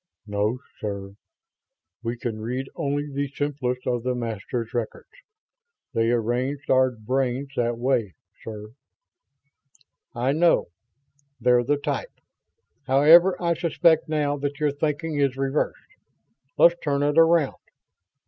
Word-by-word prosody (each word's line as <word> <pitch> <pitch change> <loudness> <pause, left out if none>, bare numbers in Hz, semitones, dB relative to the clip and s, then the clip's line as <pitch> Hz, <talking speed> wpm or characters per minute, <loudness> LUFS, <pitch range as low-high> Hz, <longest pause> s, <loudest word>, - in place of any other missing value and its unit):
"No, 105 +3 -1 0.2
sir. 100 -2 -5 0.9
We 120 +1 -3
can 115 -2 -4
read 125 +4 -4
only 145 +1 -2
the 140 +1 -1
simplest 135 -3 -3
of 120 -1 0
the 125 +1 -1
Masters' 115 0 -4
records. 120 -2 -4 0.8
They 115 0 +1
arranged 125 +4 -1
our 130 0 +5
brains 130 +3 -2
that 120 -1 0
way, 120 -6 0 0.3
sir." 105 -1 -8 1.4
"I 125 +3 +1
know. 165 - +3 0.7
They're 120 0 +4
the 145 +4 +1
type. 315 - -4 0.7
However, 160 +7 +6
I 170 -1 +1
suspect 165 -1 +2
now 145 -2 0
that 145 0 -4
your 150 -1 +2
thinking 150 +1 -2
is 135 -2 +1
reversed. 135 +2 -2 0.6
Let's 170 - +7
turn 145 -2 0
it 145 +2 +3
around. 165 -3 +3
135 Hz, 120 wpm, -24 LUFS, 120-145 Hz, 1.4 s, Let's